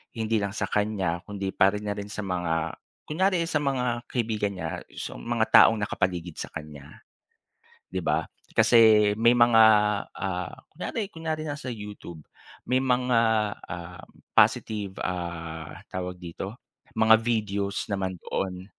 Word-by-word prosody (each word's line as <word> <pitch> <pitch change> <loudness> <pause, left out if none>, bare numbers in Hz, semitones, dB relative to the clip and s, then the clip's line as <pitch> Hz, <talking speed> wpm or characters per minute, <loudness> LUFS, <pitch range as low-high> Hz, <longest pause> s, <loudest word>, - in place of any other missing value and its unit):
hindi 110 -1 0
lang 100 0 -3
sa - - -3
kanya 100 -5 0
kundi 100 -2 -4
para 95 +2 +3
na 105 - -2
rin 100 - -6
sa 105 0 -5
mga 85 -4 -2 0.2
kunyari 185 +2 +1
sa 165 -2 0
mga 125 -4 -1
kaibigan 110 -4 -1
niya, 90 - -4 0.2
sa - - -6
mga 115 -1 0
taong 110 - +8
nakapaligid 90 -5 -2
sa - - -4
kanya, 75 -2 -10 0.9
'di 95 - -1
ba. 80 -1 0 0.3
Kasi 110 -3 +6
may 120 +1 +5
mga 120 -1 +6 0.5
ah, 95 -2 -3 0.2
kunyari 210 -3 -4
kunyari 160 -1 -3
nasa 145 -3 -5
YouTube, 105 -8 -9 0.4
may 130 +1 +1
mga 125 -2 +2 0.5
ah 85 +1 -7 0.3
positive 100 -3 +2
ah 85 -3 -5 0.2
tawag 90 0 -4
dito 90 +4 -7 0.4
mga 110 0 +7
videos 100 -4 -1
naman 95 -2 -2
doon, 90 -1 -3
105 Hz, 135 wpm, -26 LUFS, 90-120 Hz, 0.9 s, taong